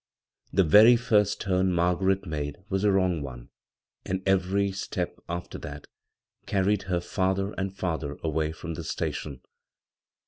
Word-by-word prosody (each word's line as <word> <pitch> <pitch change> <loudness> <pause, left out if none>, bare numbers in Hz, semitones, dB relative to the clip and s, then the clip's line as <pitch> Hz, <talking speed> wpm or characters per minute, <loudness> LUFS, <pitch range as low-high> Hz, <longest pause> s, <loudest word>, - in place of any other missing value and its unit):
The 95 - +4
very 105 +9 +8
first 105 -4 +2
turn 95 -1 +1
Margaret 95 +3 +1
made 75 -3 -4
was 95 0 0
a 105 - +4
wrong 95 -4 +2
one, 60 -4 -8 0.5
and 95 0 -3
every 95 +1 +2
step 95 - -4
after 85 +1 -5
that 75 0 -8 0.6
carried 100 +1 +1
her 90 -1 +1
farther 95 +3 -1
and 95 0 -3
farther 80 -6 -3
away 80 -1 0
from 85 +1 -6
the - - -6
station. 70 -4 -4
95 Hz, 140 wpm, -27 LUFS, 80-95 Hz, 0.6 s, very